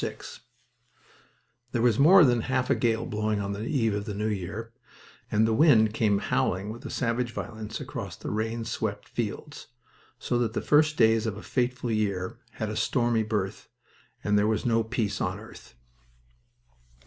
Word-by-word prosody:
VI - - -3 1.6
There 120 - +1
was 120 -2 +3
more 170 +4 +8
than 120 -3 +3
half 130 +2 0
a - - +4
gale 115 -2 0
blowing 105 0 -1
on 100 0 -3
the 100 +2 -5
eve 115 -7 +1
of 100 0 -3
the 105 - -5
new 105 +1 -2
year, 110 +2 -4 0.6
and 105 +1 +3
the 110 - +1
wind 110 -6 +5
came 105 -3 +2
howling 100 +1 -1
with 115 - -9
a - - -7
savage 120 -1 -1
violence 110 -1 -6
across - - -6
the - - -6
rain 115 +2 -2
swept 110 -2 -3
fields, 135 +6 -5 0.5
so 120 - -1
that 115 -2 0
the - - -1
first 150 +1 +3
day 110 -1 +5
of 110 -2 -3
a - - -9
fateful 125 -1 -1
year 100 -4 -1
had - - -3
a - - -4
stormy 120 -2 +1
birth, 105 -3 -3 0.5
and 105 0 +3
there 105 - +2
was 110 -1 0
no 115 -1 +2
peace 110 -2 -2
on - - -2
earth. - - -14
110 Hz, 175 wpm, -27 LUFS, 105-120 Hz, 1.6 s, more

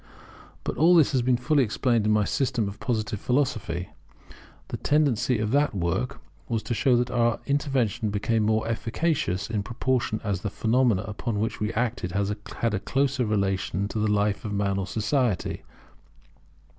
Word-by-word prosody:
But - - -3
all 170 +3 +6
this 155 -3 +5
has 130 -3 +2
been 125 0 +2
fully 140 +3 +2
explained 115 -1 +1
in - - +3
my 105 0 +3
System 125 -1 0
of 100 +2 -7
Positive 110 -4 -2
Philosophy. 115 -9 -1 0.8
The - - -3
tendency 140 -5 +2
of 105 0 -1
that 145 -4 +2
work 85 -2 -1 0.3
was 115 -2 -1
to - - -2
show 125 +2 +3
that 120 +1 0
our 120 -1 +2
intervention 130 -6 0
became 105 +2 0
more 110 +1 +1
efficacious 115 - -1
in 110 -2 -1
proportion 120 0 -1
as 100 -4 -2
the 105 - -2
phenomena 115 -1 +2
upon 105 +1 -3
which 110 +2 -2
we 105 +1 -1
acted 115 -6 -2
had 105 +3 -2
a 105 - 0
closer 135 +1 0
relation 100 -2 0
to 110 - -3
the 105 0 +1
life 105 -1 +1
of 105 -2 -4
man 100 -1 0
or 95 - -3
society. 115 - 0
110 Hz, 170 wpm, -26 LUFS, 105-125 Hz, 0.8 s, all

